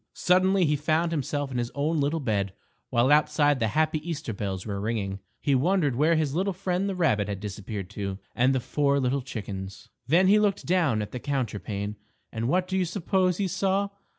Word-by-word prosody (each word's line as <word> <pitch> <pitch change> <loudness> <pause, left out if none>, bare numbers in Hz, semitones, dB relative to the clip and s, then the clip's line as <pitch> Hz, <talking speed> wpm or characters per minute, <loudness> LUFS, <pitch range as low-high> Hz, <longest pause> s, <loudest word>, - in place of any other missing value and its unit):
_ - - -45
Suddenly 185 +1 +3
he 150 -1 +2
found 155 +3 +1
himself 145 -2 -2
in 125 - -2
his 120 -1 -2
own 150 +3 0
little 145 +4 0
bed, 100 -7 -1 0.4
while 120 +4 +3
outside 145 -1 +3
the 115 - +1
happy 155 0 +2
Easter 150 -6 -4
bells 95 -2 -4
were 100 -2 -3
ringing. 100 -3 -2 0.2
He 140 - +1
wondered 145 0 +2
where 155 +6 +3
his 155 -3 0
little 190 +4 0
friend 185 +1 -1
the 195 - -2
rabbit 130 - +2
had 100 -2 -4
disappeared 100 -1 -6
to, 100 -2 -4 0.2
and 130 +2 +3
the - - +2
four 140 +2 +1
little 135 +1 0
chickens. 100 -6 -7 0.2
Then 170 +7 +4
he 205 +3 +6
looked 205 -2 +1
down 160 -12 +2
at 105 - -8
the 125 - -5
counterpane, 105 -6 -3 0.3
and 115 0 -2
what 180 +6 +1
do 190 - -1
you 185 - +2
suppose 185 0 0
he 200 - 0
saw. 195 +2 0
145 Hz, 205 wpm, -27 LUFS, 110-175 Hz, 0.4 s, he